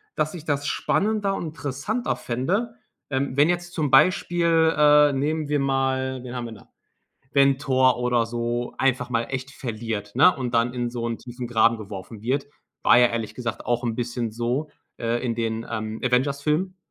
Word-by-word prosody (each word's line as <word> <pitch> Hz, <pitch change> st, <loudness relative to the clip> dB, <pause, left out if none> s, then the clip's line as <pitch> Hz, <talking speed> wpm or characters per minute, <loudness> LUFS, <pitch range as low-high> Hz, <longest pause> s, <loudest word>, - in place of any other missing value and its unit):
dass 155 Hz, 0 st, -1 dB
ich 165 Hz, -3 st, -9 dB
das 145 Hz, -1 st, -1 dB
spannender 205 Hz, -1 st, 0 dB
und -, -, -4 dB
interessanter 160 Hz, -, -3 dB
fände, 190 Hz, -, -2 dB, 0.3 s
ähm, 135 Hz, -1 st, -1 dB
wenn 150 Hz, +4 st, +5 dB
jetzt 175 Hz, 0 st, -2 dB
zum 150 Hz, -5 st, -1 dB
Beispiel, 165 Hz, +1 st, +4 dB
äh, 150 Hz, -1 st, +6 dB
nehmen 150 Hz, +2 st, -1 dB
wir 150 Hz, -, +1 dB
mal 130 Hz, -1 st, 0 dB
wen 125 Hz, 0 st, -7 dB
haben 120 Hz, -, -3 dB
wir 115 Hz, -, -7 dB
da, -, -, -16 dB, 0.6 s
wenn 140 Hz, -1 st, +4 dB
Thor 130 Hz, -2 st, +3 dB
oder 125 Hz, -1 st, +1 dB
so 120 Hz, +1 st, -3 dB
einfach 130 Hz, -2 st, +1 dB
mal 115 Hz, -1 st, +1 dB
echt 135 Hz, +1 st, -5 dB
verliert, 110 Hz, -5 st, -5 dB
ne? 180 Hz, -, +6 dB
Und 125 Hz, -2 st, -4 dB
dann 115 Hz, +1 st, +2 dB
in 120 Hz, -1 st, -2 dB
so 120 Hz, -1 st, -3 dB
'n 115 Hz, -1 st, -3 dB
tiefen 125 Hz, 0 st, -7 dB
Graben 115 Hz, 0 st, +3 dB
geworfen 100 Hz, 0 st, -8 dB
wird. 135 Hz, +5 st, -1 dB, 0.4 s
War -, -, +6 dB
ja 125 Hz, -, +7 dB
ehrlich 115 Hz, -2 st, -3 dB
gesagt 120 Hz, -2 st, -5 dB
auch 120 Hz, 0 st, 0 dB
bisschen 120 Hz, -1 st, -3 dB
so, 120 Hz, +6 st, -2 dB, 0.3 s
äh, 115 Hz, +2 st, -1 dB
in 115 Hz, -, 0 dB
den, 115 Hz, 0 st, -2 dB
ähm, 110 Hz, -1 st, -4 dB
Avengers-Filmen, 140 Hz, +8 st, 0 dB
130 Hz, 175 wpm, -24 LUFS, 120-150 Hz, 0.6 s, ja